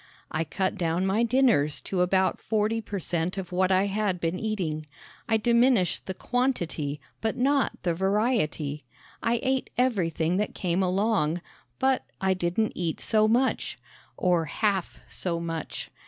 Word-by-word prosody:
I 160 Hz, -, 0 dB
cut 190 Hz, +5 st, -2 dB
down 170 Hz, +2 st, +1 dB
my 195 Hz, +4 st, +2 dB
dinners 235 Hz, -, +3 dB
to 185 Hz, -2 st, -1 dB
about 185 Hz, +1 st, +2 dB
forty 220 Hz, +1 st, 0 dB
per 205 Hz, -1 st, -5 dB
cent 175 Hz, +1 st, -2 dB
of 185 Hz, -2 st, -5 dB
what 185 Hz, +1 st, +2 dB
I 190 Hz, +1 st, +4 dB
had 200 Hz, -2 st, 0 dB
been 170 Hz, +2 st, -1 dB
eating. 170 Hz, -9 st, -2 dB, 0.4 s
I 225 Hz, -, +4 dB
diminished 235 Hz, -4 st, +3 dB
the 190 Hz, -, -3 dB
quantity, 175 Hz, -, -1 dB, 0.2 s
but 220 Hz, -1 st, -1 dB
not 275 Hz, +2 st, +2 dB
the 175 Hz, -, +1 dB
variety. 190 Hz, -, 0 dB, 0.4 s
I 230 Hz, +1 st, +1 dB
ate 265 Hz, 0 st, 0 dB
everything 180 Hz, -9 st, +1 dB
that 210 Hz, -, -1 dB
came 180 Hz, 0 st, 0 dB
along, 185 Hz, -3 st, +1 dB, 0.4 s
but 265 Hz, -1 st, +2 dB, 0.2 s
I 190 Hz, -1 st, +2 dB
didn't 185 Hz, +4 st, 0 dB
eat 170 Hz, -3 st, -2 dB
so 215 Hz, -1 st, +3 dB
much 245 Hz, +4 st, +1 dB, 0.4 s
or 175 Hz, -3 st, +2 dB
half 195 Hz, +3 st, -1 dB
so 170 Hz, -2 st, -2 dB
much. 165 Hz, -1 st, -5 dB
190 Hz, 150 wpm, -27 LUFS, 170-225 Hz, 0.4 s, I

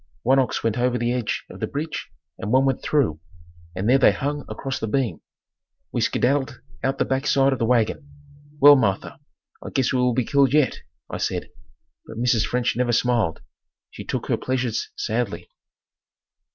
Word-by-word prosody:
One 135 Hz, +3 st, +4 dB
ox 130 Hz, -3 st, -1 dB
went 115 Hz, +1 st, 0 dB
over 125 Hz, 0 st, +1 dB
the 120 Hz, 0 st, 0 dB
edge 125 Hz, -3 st, -2 dB
of -, -, -11 dB
the -, -, -2 dB
bridge 150 Hz, +3 st, -5 dB, 0.3 s
and 105 Hz, -, -4 dB
one 130 Hz, +2 st, +4 dB
went 135 Hz, -2 st, 0 dB
through, 125 Hz, -, +1 dB, 0.6 s
and 95 Hz, +3 st, -2 dB
there 130 Hz, +3 st, +5 dB
they -, -, +6 dB
hung 145 Hz, +1 st, -3 dB
across 135 Hz, -1 st, -4 dB
the 110 Hz, -, -3 dB
beam. 125 Hz, +1 st, -1 dB, 0.7 s
We -, -, -1 dB
skedaddled 135 Hz, +2 st, 0 dB, 0.2 s
out 135 Hz, +1 st, 0 dB
the -, -, +1 dB
backside 135 Hz, 0 st, +2 dB
of 130 Hz, -, -4 dB
the 115 Hz, -, +1 dB
wagon. 125 Hz, +4 st, +1 dB, 0.5 s
"Well, 145 Hz, 0 st, +9 dB
Martha, 105 Hz, -1 st, -1 dB, 0.4 s
I -, -, -6 dB
guess 130 Hz, -2 st, 0 dB
we 130 Hz, -, +1 dB
will 125 Hz, -1 st, +2 dB
be 125 Hz, -, +1 dB
killed 140 Hz, -1 st, +3 dB
yet," 150 Hz, -3 st, +2 dB, 0.3 s
I -, -, -3 dB
said. -, -, -3 dB, 0.6 s
But 110 Hz, -, -9 dB
Mrs. 120 Hz, -2 st, +2 dB
French 125 Hz, 0 st, 0 dB
never 120 Hz, 0 st, +1 dB
smiled. 115 Hz, -8 st, +1 dB, 0.5 s
She -, -, -9 dB
took -, -, -3 dB
her -, -, 0 dB
pleasures 125 Hz, -3 st, -2 dB
sadly. 410 Hz, +2 st, -2 dB
125 Hz, 180 wpm, -23 LUFS, 120-135 Hz, 0.7 s, Well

